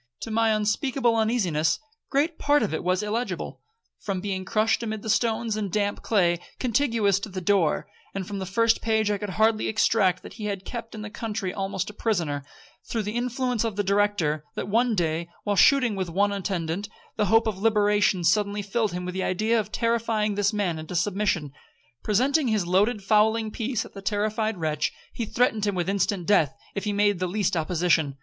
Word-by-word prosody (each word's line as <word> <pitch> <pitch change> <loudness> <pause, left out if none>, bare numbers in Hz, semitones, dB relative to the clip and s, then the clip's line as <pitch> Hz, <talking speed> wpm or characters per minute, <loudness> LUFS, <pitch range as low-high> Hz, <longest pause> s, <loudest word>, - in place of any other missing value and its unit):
To 225 - -5
my 225 0 +2
unspeakable 230 +3 +1
uneasiness, 210 -9 +1 0.3
great 305 +4 0
part 290 -2 +3
of 205 - -2
it 160 - -2
was 185 +3 +1
illegible, 225 +4 -3 0.4
from 195 -3 -3
being 190 -1 -3
crushed 220 +3 +1
amid 220 -2 -4
the 220 - 0
stones 225 -1 +1
and 205 -3 -3
damp 205 0 -1
clay 175 -6 +2 0.2
contiguous 230 -6 +2
to 205 - -6
the 190 -1 -5
door, 180 -3 +2 0.3
and 195 -1 -3
from 200 -1 -4
the 190 - -4
first 230 +4 +2
page 220 -2 +1
I 205 - -1
could 210 - -4
hardly 220 0 +3
extract 200 -4 +2
that - - -10
he 210 +1 -7
had 200 -2 -3
been - - -31
kept 230 -2 -6
in 215 - -6
the 215 - -7
country 210 -4 -3
almost 195 +1 -3
a - - -20
prisoner, 170 - -1 0.4
through 225 -2 -3
the 210 +2 -4
influence 250 -1 -1
of 225 -3 -2
the 205 - 0
Director; 200 -7 +1
that - - -3
one 230 +3 +2
day, 170 -1 -1
while 205 -1 0
shooting 250 0 +5
with 190 -2 -3
only 165 - -9
one 205 0 +3
attendant, 195 -1 -3 0.3
the 210 - +1
hope 225 +4 +4
of 215 -4 -2
liberation 205 -3 +2
suddenly 205 +2 +1
filled 205 0 -1
him 180 0 -4
with 180 - -4
the 190 - -2
idea 215 +6 +1
of 210 -1 -4
terrifying 230 -2 0
this 205 0 +1
man 195 -7 -1
into 160 +3 -7
submission. 180 -5 0 0.5
Presenting 260 +7 +2
his 215 -5 +1
loaded 200 +4 +2
fowling 215 +1 +3
piece 235 +1 -2
at - - -14
the 195 - -8
terrified 215 +1 -1
wretch, 155 -2 -1 0.2
he 230 - -3
threatened 220 -3 +1
him 200 - 0
with 175 -1 -1
instant 195 -2 0
death, 165 -8 +3 0.2
if 200 - -4
he 210 - 0
made 205 -2 +2
the 185 - 0
least 195 0 0
opposition. 160 -3 +1
205 Hz, 200 wpm, -25 LUFS, 185-225 Hz, 0.5 s, shooting